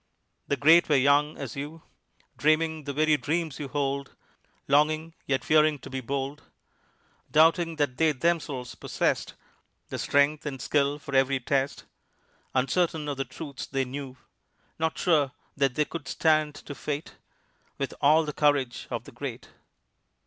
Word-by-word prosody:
The 140 - 0
great 160 +5 +6
were 150 - +4
young 140 +3 +3
as 130 -5 -6
you, 150 +3 -7 0.5
Dreaming 155 0 +1
the 140 - -3
very 155 +1 +3
dreams 155 +3 -2
you 145 - -4
hold, 140 -1 -2 0.5
Longing 155 +3 +2
yet 135 -1 0
fearing 155 -1 +4
to 130 - -11
be 135 0 -3
bold, 140 +3 -3 0.9
Doubting 165 +2 +4
that 145 -5 -1
they 160 -1 +4
themselves 145 -4 -1
possessed - - -1 0.5
The - - -4
strength 145 +1 +2
and 135 -3 -5
skill 145 +1 +1
for 140 -1 -9
every 135 0 +3
test, 135 +2 -1 0.7
Uncertain 150 +4 +1
of 140 - -3
the 135 - -2
truths 145 -4 -8
they 135 -1 -1
knew, 130 0 -7 0.6
Not 160 0 0
sure 150 -7 +2 0.2
that 135 -3 +1
they 150 - +2
could 160 -4 -7
stand 155 -1 +2
to 145 - -8
fate 145 +1 -5 0.6
With - - -3
all 155 +3 +5
the 150 - -4
courage 145 -5 +1
of - - -3
the - - -13
great. - - -7
145 Hz, 150 wpm, -27 LUFS, 135-155 Hz, 0.9 s, great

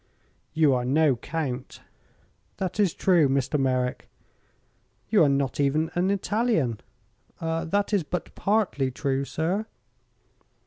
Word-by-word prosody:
"You 155 -4 +4
are 125 -1 0
no 140 +2 +3
count." 135 -1 -5 0.8
"That 190 +1 -3
is 200 -5 +4
true, 170 -7 +3
Mr. 135 +2 0
Merrick." 130 -1 -1 1.0
"You 205 -5 +5
are 145 - +4
not 140 -1 0
even 150 +3 +1
an 180 +2 +1
Italian." 200 - 0 0.6
"That 165 +5 -1
is 200 - +3
but 175 +3 -5
partly 195 -10 0
true, 135 +1 -2
sir." 175 - -2
160 Hz, 120 wpm, -26 LUFS, 135-185 Hz, 1.0 s, You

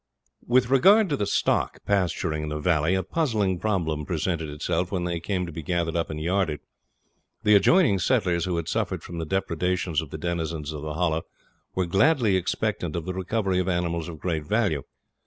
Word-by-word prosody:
With 125 0 +3
regard 195 - +6
to 145 - +1
the 105 -7 -1
stock - - 0
pasturing 90 -5 0
in 75 - -4
the 75 - -3
valley, 80 +2 +2
a 95 - 0
puzzling 105 - 0
problem 85 -7 -1
presented 80 0 -2
itself 80 +4 -2
when 90 -3 -1
they 85 -1 -2
came 90 +1 -2
to 85 - -7
be 80 - -6
gathered 85 0 -1
up 85 -1 -1
and 75 - -4
yarded. 85 -2 0 0.8
The 105 - +5
adjoining 100 - +5
settlers 90 -7 +1
who 90 -1 -1
had 85 - -3
suffered - - -2
from 85 -1 -7
the 80 - -4
depredations 90 -2 0
of 80 - -9
the 80 - -6
denizens 80 -2 -3
of 75 - -6
the 75 0 -5
Hollow 80 -2 0 0.5
were 95 - +1
gladly 105 - +3
expectant 95 -2 -1
of 85 -2 -3
the 95 - -3
recovery 95 0 -1
of 90 0 0
animals 85 -2 -1
of 80 - -8
great 80 -1 -2
value. 95 - 0
90 Hz, 195 wpm, -25 LUFS, 80-100 Hz, 0.8 s, regard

